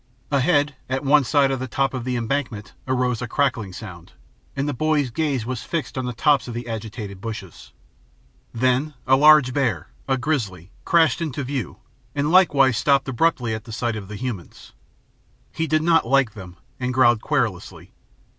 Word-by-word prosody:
Ahead, 145 Hz, 0 st, +2 dB
at 130 Hz, +2 st, -2 dB
one 145 Hz, +1 st, +5 dB
side 135 Hz, +3 st, +2 dB
of 135 Hz, -, -2 dB
the 130 Hz, -, -4 dB
top 135 Hz, +2 st, 0 dB
of 125 Hz, -2 st, -4 dB
the 125 Hz, -1 st, -1 dB
embankment, 115 Hz, -3 st, -3 dB
arose 125 Hz, -2 st, 0 dB
a 125 Hz, -, -3 dB
crackling 120 Hz, -6 st, 0 dB
sound, 90 Hz, -, -10 dB, 0.4 s
and 140 Hz, +1 st, -1 dB
the 145 Hz, -, -1 dB
boy's 150 Hz, -1 st, 0 dB
gaze 140 Hz, -4 st, -1 dB
was 125 Hz, -1 st, -4 dB
fixed 165 Hz, -3 st, -4 dB
on 130 Hz, -1 st, -2 dB
the -, -, -2 dB
tops 140 Hz, +4 st, +2 dB
of 120 Hz, -, -6 dB
the 120 Hz, 0 st, -5 dB
agitated 110 Hz, -3 st, -6 dB
bushes. 105 Hz, -6 st, -8 dB, 0.8 s
Then 130 Hz, +5 st, 0 dB
a 130 Hz, -, +5 dB
large 150 Hz, -2 st, +6 dB
bear, 120 Hz, -, -1 dB, 0.2 s
a 135 Hz, -1 st, +1 dB
grizzly, 105 Hz, -, -3 dB
crashed 165 Hz, -5 st, +3 dB
into 145 Hz, -4 st, -3 dB
view, 130 Hz, -6 st, -4 dB, 0.4 s
and 145 Hz, +2 st, 0 dB
likewise 140 Hz, -, +5 dB
stopped 140 Hz, +1 st, +2 dB
abruptly, 125 Hz, -3 st, +1 dB
at 110 Hz, +1 st, -7 dB
sight 115 Hz, +1 st, -2 dB
of 100 Hz, -3 st, -7 dB
the 105 Hz, -, -7 dB
humans. 105 Hz, -5 st, -7 dB, 0.8 s
He 160 Hz, -, -2 dB
did 155 Hz, 0 st, +1 dB
not 165 Hz, -6 st, +3 dB
like 135 Hz, -3 st, +3 dB
them, 90 Hz, -5 st, -11 dB, 0.2 s
and 125 Hz, -1 st, -2 dB
growled 120 Hz, -4 st, +4 dB
querulously. 120 Hz, -, -3 dB
130 Hz, 175 wpm, -22 LUFS, 115-145 Hz, 0.8 s, large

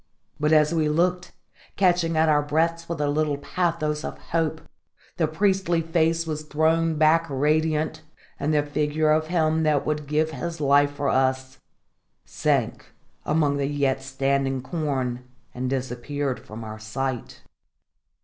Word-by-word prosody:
But 150 Hz, +1 st, +1 dB
as 155 Hz, 0 st, +4 dB
we 155 Hz, -2 st, +1 dB
looked, 175 Hz, +3 st, 0 dB, 0.4 s
catching 175 Hz, -3 st, +2 dB
at 160 Hz, +1 st, +4 dB
our 150 Hz, -1 st, +4 dB
breaths 165 Hz, +3 st, 0 dB
with 170 Hz, -, -3 dB
a 145 Hz, -, +1 dB
little 145 Hz, 0 st, 0 dB
pathos 155 Hz, -1 st, -1 dB
of -, -, -5 dB
hope, 160 Hz, -1 st, -2 dB, 0.6 s
the 160 Hz, -, +2 dB
priestly 185 Hz, 0 st, +1 dB
face 165 Hz, 0 st, +1 dB
was 155 Hz, -1 st, -3 dB
thrown 160 Hz, +2 st, +1 dB
back 160 Hz, +2 st, +3 dB
radiant, 155 Hz, +2 st, 0 dB, 0.4 s
and 145 Hz, +2 st, 0 dB
the 150 Hz, -1 st, +2 dB
figure 150 Hz, +1 st, 0 dB
of 155 Hz, 0 st, +2 dB
him 160 Hz, -2 st, +1 dB
that 155 Hz, -3 st, +1 dB
would 150 Hz, -1 st, -2 dB
give 155 Hz, +2 st, +1 dB
his 165 Hz, +4 st, -5 dB
life 145 Hz, 0 st, +4 dB
for 145 Hz, -1 st, -1 dB
us 130 Hz, 0 st, 0 dB, 0.7 s
sank -, -, -1 dB, 0.4 s
amongst 150 Hz, -2 st, +2 dB
the 140 Hz, -, 0 dB
yet 140 Hz, -2 st, 0 dB
standing 135 Hz, 0 st, -1 dB
corn 130 Hz, -6 st, -2 dB, 0.3 s
and 125 Hz, +1 st, -3 dB
disappeared 130 Hz, +1 st, -3 dB
from 110 Hz, +2 st, -9 dB
our 110 Hz, 0 st, -7 dB
sight. 125 Hz, +3 st, -4 dB
150 Hz, 145 wpm, -24 LUFS, 140-160 Hz, 0.7 s, as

